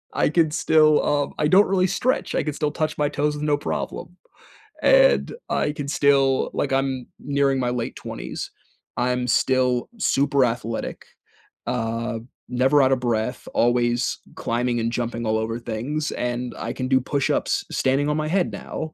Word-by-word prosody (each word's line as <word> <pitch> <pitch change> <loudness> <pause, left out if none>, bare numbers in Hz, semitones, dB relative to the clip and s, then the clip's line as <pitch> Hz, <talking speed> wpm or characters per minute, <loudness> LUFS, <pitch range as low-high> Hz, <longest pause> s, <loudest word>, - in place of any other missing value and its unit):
I - - +2
could 160 -1 +2
still, 155 -1 +4
um, 145 -1 0
I 150 - +3
don't 195 +6 +5
really 185 -1 +2
stretch, 255 +8 -1
I - - +1
could 150 -2 -3
still 150 -1 -1
touch 155 0 -2
my 145 - +2
toes 150 +1 -1
with 150 - -5
no 150 -1 +2
problem, 170 +3 -5 0.7
and - - +5 0.2
I 150 - 0
can 145 -2 -5
still, 140 -2 +3
like, 135 - -1
I'm 135 -2 -1
nearing 140 -1 +1
my 125 -1 0
late 120 -1 -3
20s, - - -6 0.5
I'm 125 0 0
still 125 +1 +2
super 140 -5 +2
athletic, 115 -1 -4 0.6
um, 115 0 -3 0.2
never 130 +4 +3
out 130 0 +3
of 130 - +2
breath, 120 -1 -2
always 120 0 +1 0.2
climbing 120 +1 -1
and 115 0 -1
jumping 120 0 -3
all 110 0 +2
over 115 +1 -2
things, 125 +7 -3
and 125 0 -3
I 115 - -4
can 130 - -3
do 130 0 +4
push 140 +2 -1
ups - - 0
standing 135 +3 +1
on 150 - 0
my 155 0 -1
head 180 +2 +1
now, 155 0 -6
135 Hz, 170 wpm, -23 LUFS, 120-150 Hz, 0.7 s, don't